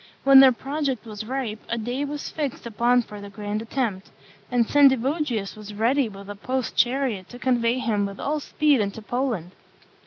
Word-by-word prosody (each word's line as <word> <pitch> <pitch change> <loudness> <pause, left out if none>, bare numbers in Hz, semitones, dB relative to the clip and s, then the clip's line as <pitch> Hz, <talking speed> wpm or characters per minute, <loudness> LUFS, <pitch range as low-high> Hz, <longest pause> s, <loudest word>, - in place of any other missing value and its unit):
When 275 0 +8
their 265 -1 +9
project 270 -1 -3
was 215 -1 -7
ripe, 250 -4 -3
a 235 - -1
day 245 +5 -2
was 290 +1 -5
fixed 290 -6 -4
upon 240 +2 +2
for 210 -2 -10
the 200 - -8
grand 205 +1 -4
attempt; 225 -5 -3 0.4
and 245 -2 +2
Sendivogius 270 -5 +2
was 210 -1 -9
ready 240 +4 +2
with 200 -1 -11
a 205 - -6
post 255 +4 -3
chariot 240 -7 +1
to 245 - -10
convey 245 -1 +1
him 210 -5 0
with 200 0 -9
all 300 +2 -1
speed 295 -3 +2
into 205 +2 -4
Poland. 235 -8 -2
240 Hz, 180 wpm, -24 LUFS, 210-270 Hz, 0.4 s, their